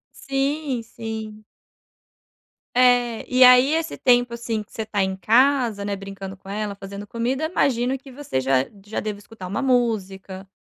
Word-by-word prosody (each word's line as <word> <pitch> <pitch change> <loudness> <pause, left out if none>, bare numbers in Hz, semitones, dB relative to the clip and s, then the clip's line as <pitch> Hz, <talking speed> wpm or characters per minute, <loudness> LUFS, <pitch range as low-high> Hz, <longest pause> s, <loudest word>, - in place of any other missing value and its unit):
Sim, 275 -1 -2
sim. 220 -1 -7 1.3
É, 245 -2 +3
e 255 +1 +4
aí 250 +3 +7
esse 325 0 -2
tempo, 245 -1 +3
assim, 230 -2 -3
que 210 - -20
você 225 - -4
está 210 -2 -1
em 190 0 -1
casa, 230 +1 +3
né, 200 -1 -2
brincando 195 0 -8
com 190 - -16
ela, 205 0 -3
fazendo 200 +1 -8
comida, 245 +7 -2
imagino 260 -5 +1
que 270 0 -14
você 260 - -3
já 130 0 +2 0.2
já 215 - -3
deva 210 -1 -4
escutar 205 -2 -11
uma 200 +9 -3
música 195 -7 -1
225 Hz, 160 wpm, -23 LUFS, 200-255 Hz, 1.3 s, aí